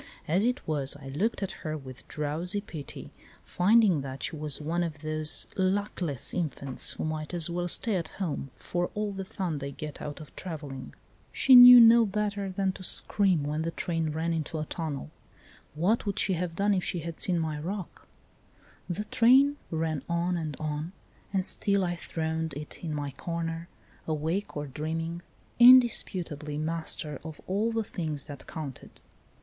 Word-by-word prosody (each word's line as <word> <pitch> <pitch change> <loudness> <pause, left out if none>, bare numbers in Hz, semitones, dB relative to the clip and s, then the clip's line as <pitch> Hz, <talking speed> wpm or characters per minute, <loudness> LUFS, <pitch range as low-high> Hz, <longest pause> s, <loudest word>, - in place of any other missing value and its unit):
As 185 +7 +2
it 250 +1 -1
was, 145 -3 0
I 135 -2 -10
looked 200 +10 -1
at 190 - -2
her 155 -1 -3
with 130 -3 -11
drowsy 160 +6 -1
pity, 160 -8 -8 0.3
finding 195 -3 +4
that 135 0 -7
she - - -2
was 150 -2 -4
one 165 +3 -1
of 160 -4 -3
those 155 0 -1
luck 195 +2 0
less 145 -8 -1
infants 140 -6 0
who - - -5
might 155 +2 -3
as 170 0 -1
well 175 +1 -1
stay 205 +3 +2
at 165 -2 -3
home 160 -8 -4
for 175 0 -2
all 210 0 -1
the 195 -1 -5
fun 180 -5 -3
they 140 0 -5
get 150 +1 -7
out 145 -1 -6
of 155 - -12
travelling. 150 -7 -7 0.4
She 265 - +6
knew 245 0 +12
no 230 -1 +8
better 205 -1 -2
than 190 0 0
to 185 - -11
scream 185 -4 +2
when 150 +2 -2
the 165 - -1
train 165 -1 -2
ran 160 +2 -1
into 160 0 -3
a 155 - -2
tunnel; 150 - -5 0.6
what 200 +8 +1
would 200 - -1
she 195 - +1
have 175 -1 -3
done 200 +2 +2
if 185 -2 0
she 175 - -3
had 165 0 -6
seen 180 -2 +1
my 155 -2 -2
roc? 185 +3 -6 0.8
The 180 +4 -2
train 270 +7 +5
ran 160 -2 -1
on 170 +1 0
and 155 -4 -4
on, 155 +3 -3 0.4
and 190 -2 0
still 200 -1 0
I 175 -1 -1
throned 160 -2 -3
it 150 +4 -8
in 165 - -3
my 145 -2 -3
corner, 165 +3 -4 0.4
awake 160 +5 -2
or 145 - -3
dream 155 +4 -3
ing, 170 +1 -5 0.4
indisputably 185 - +5
master 155 -2 -3
of 160 -2 -8
all 210 +5 0
the 225 0 0
things 155 -8 -4
that 145 -3 -10
counted. 145 -5 -8
165 Hz, 175 wpm, -28 LUFS, 150-190 Hz, 0.8 s, knew